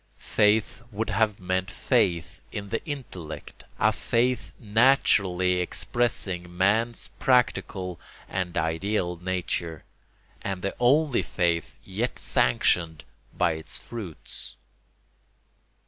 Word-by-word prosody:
Faith 105 -2 +2
would 110 +2 -2
have 105 0 +2
meant 95 +1 -1
faith 90 -7 0
in 100 -2 -5
the 115 - -2
intellect, 95 - -7
a - - +4
faith 125 +2 0
naturally 100 -6 +3
expressing 90 -3 -1
man's 110 +5 +2
practical 100 - +1 0.3
and 90 -2 -3
ideal 90 +3 0
nature, 85 -3 -2 0.6
and 95 -2 -4
the 100 - -2
only 135 0 +4
faith 85 -1 0
yet 105 +6 -2
sanctioned 80 +5 +2 0.3
by - - +3
its 80 0 -2
fruits. 100 -9 -5
95 Hz, 100 wpm, -26 LUFS, 90-115 Hz, 0.6 s, a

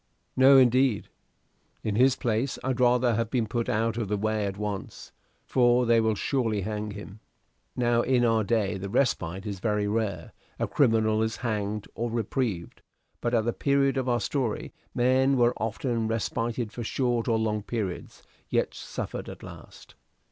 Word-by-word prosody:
"No, 135 +1 +7
indeed. 130 -3 +3 0.7
In 105 - -1
his 130 +3 +4
place, 120 +3 -1
I'd 130 -1 -1
rather 125 -1 +3
have 115 0 -1
been 120 -3 0
put 115 +2 -2
out 115 +1 0
of 115 -3 -2
the 105 +1 -1
way 110 0 0
at 100 0 -5
once; 105 -2 -5 0.3
for 125 -1 +3
they 115 -1 +4
will 110 -1 +1
surely 115 -3 0
hang 105 +1 -3
him." 105 0 -9 0.6
Now 120 -1 +2
in 125 -1 +2
our 115 -1 +3
day 105 -2 0
the 100 +1 -5
respite 95 -6 0
is 100 -3 -4
very 105 0 0
rare: 105 -2 -2 0.2
a - - -1
criminal 110 -4 +2
is 110 0 0
hanged 105 -2 -2
or 120 +1 -3
reprieved. 115 -5 -2 0.4
But 120 0 0
at 110 -1 +2
the 120 - 0
period 140 -1 +2
of 130 -1 -1
our 120 -1 +2
story 125 -2 -2 0.2
men 130 +2 +3
were 120 0 +4
often 115 +1 -2
respited 115 +1 -2
for 120 - -6
short 120 0 -1
or 115 -2 +2
long 110 -1 -1
periods, 105 -4 -5 0.3
yet - - 0
suffered - - -6
at - - -10
last. - - -12
115 Hz, 170 wpm, -27 LUFS, 105-125 Hz, 0.7 s, No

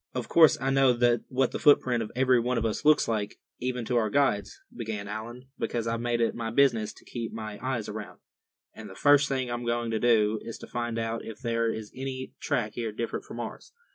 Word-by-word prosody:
"Of 125 -2 -3
course 160 -2 +6
I 135 +1 0
know 135 -2 +4 0.3
what 130 0 +1
the - - -4
footprint 125 -5 +4
of 110 - -5
every 130 -1 +4
one 125 +1 0
of 115 - 0
us 110 +4 -2
looks 150 0 +5
like, 105 -2 -2 0.2
even 125 -1 -2
to 120 +1 0
our 110 -2 +2
guides," 120 -6 +1 0.2
began 110 -4 -4
Allan; 120 +5 -7
"because 115 -2 -2
I've 115 0 -1
made 120 0 0
it 115 - +2
my 115 -1 -4
business 115 -4 +3
to - - -19
keep 115 -2 -5
my 110 -2 -6
eyes 125 -4 -2
around. 105 0 -7 0.5
And 110 -2 -10
the 95 - -11
first 145 +3 +4
thing 130 -3 -1
I'm 120 0 -3
going 120 -1 -1
to 110 - 0
do 110 -2 +3
is 115 - -7
to - - -10
find 120 -1 -3
out 115 0 -2
if 110 -1 -8
there 115 -2 0
is 110 -2 -6
any 130 0 -5
track 125 -8 -1
here 115 -2 -3
different 115 +2 -4
from - - -8
ours. - - -7
120 Hz, 225 wpm, -28 LUFS, 110-130 Hz, 0.5 s, course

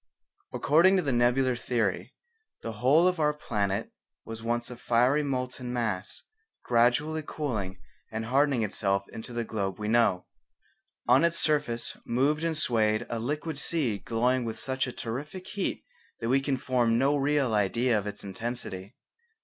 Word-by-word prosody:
According 170 +7 +4
to 180 - +1
the 140 - 0
Nebular 125 +1 +2
Theory 115 -4 -2 0.5
the 115 - -3
whole 135 +10 +4
of 180 -2 0
our 150 -1 +2
planet 105 -7 -2 0.3
was 115 0 -7
once 120 +1 -2
a - - -6
fiery 125 +4 +2
molten 125 -3 -3
mass 110 -6 -3 0.4
gradually 125 +7 +2
cooling 110 -12 -3 0.3
and 110 0 -3
hardening 135 0 +2
itself 100 -1 -1
into 110 +2 -8
the 120 0 -2
globe 100 -4 -3
we 105 - -4
know. 110 -5 +2 0.8
On 125 +5 +5
its 170 0 +2
surface 145 -8 0
moved 145 +6 +1
and 165 -2 0
swayed 110 -5 +1
a 115 - -2
liquid 150 +5 -3
sea 135 -11 0
glowing 125 +4 +1
with 115 -1 -4
such 130 +2 -2
a - - -4
terrific 145 +11 -6
heat 200 0 -3 0.3
that 115 - -2
we 135 +2 +3
can 135 -1 -1
form 120 -3 +1
no 135 +4 +3
real 140 -3 +1
idea 115 +4 +2
of 105 -1 -1
its 105 - -7
intensity. 100 0 -5
120 Hz, 155 wpm, -28 LUFS, 110-140 Hz, 0.8 s, On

